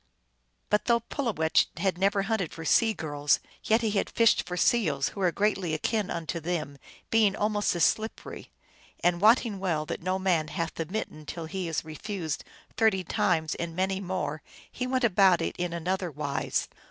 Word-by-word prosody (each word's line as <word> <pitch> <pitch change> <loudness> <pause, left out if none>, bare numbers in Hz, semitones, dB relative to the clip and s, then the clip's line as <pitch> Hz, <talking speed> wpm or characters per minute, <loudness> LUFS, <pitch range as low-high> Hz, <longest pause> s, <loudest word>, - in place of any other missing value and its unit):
But 210 - +2
though 235 -1 +3
Pulowech 225 - +1
had 190 -3 0
never 195 +1 +2
hunted 200 -5 -1
for 165 - -8
sea 225 +7 +4
girls, 145 -6 0 0.3
yet 220 +2 +3
he 220 - +1
had 205 - 0
fished 230 -1 +3
for 180 - -4
seals, 155 - +2
who 200 - -7
are 180 -2 +3
greatly 195 -4 0
akin 210 +5 -1
unto 170 0 -3
them, 155 -4 -3 0.3
being 215 -3 +4
almost 210 -2 0
as 170 - +2
slippery; 220 +5 -1 0.5
and 175 0 +2
wotting 220 -1 +4
well 165 -5 -1
that - - -5
no 185 +2 0
man 180 -5 +1
hath 165 +1 -3
the 165 - -4
mitten 155 -6 -5
till 165 -2 -5
he 185 +2 -4
is 160 -1 -2
refused 160 0 -4 0.3
thirty 220 -4 +3
times 175 -5 +1
and 170 -1 -5
many 190 +1 0
more, 175 -6 -3 0.3
he 250 - -3
went 260 0 0
about 195 -5 +5
it - - -2
in 175 -1 -2
another 180 +2 -2
wise. 145 -2 -2
185 Hz, 175 wpm, -28 LUFS, 165-210 Hz, 0.5 s, about